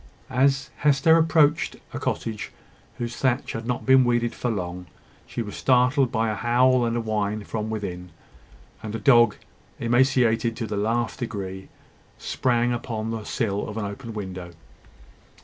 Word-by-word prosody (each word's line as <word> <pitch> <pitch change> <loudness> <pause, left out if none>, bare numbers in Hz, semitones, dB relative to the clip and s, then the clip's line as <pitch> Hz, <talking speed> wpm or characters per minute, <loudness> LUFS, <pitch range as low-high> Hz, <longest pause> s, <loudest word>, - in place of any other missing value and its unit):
As 135 +1 +2
Hester 145 +2 +4
approached 160 -2 +3 0.2
a - - -4
cottage 110 -2 -3 0.5
whose 120 -1 -4
thatch 130 0 0
had 115 +1 -5
not 125 -1 -2
been 130 0 +6
weeded 120 -1 +1
for 125 - -3
long, 90 -4 -4 0.4
she 120 - -4
was 105 -2 -8
startled 125 +1 +3
by 110 -2 0
a - - -1
howl 125 +2 +3
and 115 0 -1
whine 105 -1 -1
from 110 +1 -4
within; 90 -5 -5 0.7
and 110 0 -5
a - - -3
dog, 120 -1 +5 0.4
emaciated 120 -1 +2
to 115 - -3
the 105 - -4
last 115 +3 -1
degree, 95 -5 -5 0.5
sprang 120 -1 0
upon 115 -2 -3
the 110 -1 -4
sill 105 -4 -2
of 105 - -7
an 110 - -2
open 110 +3 -7
window. 95 -4 -6
115 Hz, 150 wpm, -24 LUFS, 105-125 Hz, 0.7 s, been